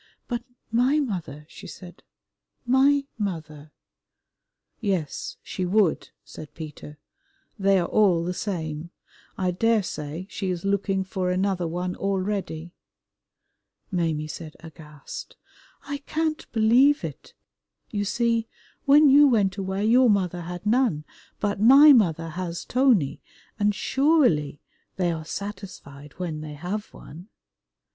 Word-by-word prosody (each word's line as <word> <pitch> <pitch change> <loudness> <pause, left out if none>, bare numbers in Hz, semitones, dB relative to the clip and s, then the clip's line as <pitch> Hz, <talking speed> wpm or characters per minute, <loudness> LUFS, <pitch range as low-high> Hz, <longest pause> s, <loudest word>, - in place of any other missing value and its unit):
"But 240 -1 -2 0.3
my 250 +6 +3
mother," 170 - -4
she - - -12
said, 175 -2 -12 0.6
"my 275 +3 +3
mother" 155 -6 -5 1.1
"Yes, 190 - -3
she 185 - -4
would," 185 -1 +1
said 155 - -11
Peter, 150 -1 -9 0.6
"they 195 0 +4
are 175 - +1
all 185 -6 +3
the 180 +1 -2
same. 165 -5 -4 0.5
I 185 -1 0
daresay 185 -6 -1
she 195 -2 -4
is 180 0 -3
looking 195 -1 0
for 185 -1 -3
another 185 -1 0
one 180 +2 -3
already." 190 -4 -3 1.2
Maimie 165 -4 -1
said 155 0 -8
aghast, 160 - -10 0.5
"I 285 -1 -5
can't 310 +2 -3
believe 245 +6 +4
it. - - -8 0.6
You 205 -2 -1
see, 230 +2 0 0.4
when 295 +2 +7
you 285 +2 +7
went 205 -7 +2
away 195 +1 -2
your 245 +2 +5
mother 185 -4 +1
had 175 +2 -7
none, 215 - +1 0.3
but 205 -1 -1
my 280 +6 +9
mother 165 - +2
has 175 +1 -5
Tony, 225 - +2 0.4
and 205 0 +2
surely 255 - +2 0.3
they 180 -2 0
are 160 -1 -5
satisfied 185 -8 -8
when 165 -4 -4
they 155 -1 -7
have 185 +8 -5
one." 170 +6 -12
190 Hz, 120 wpm, -25 LUFS, 165-225 Hz, 1.2 s, my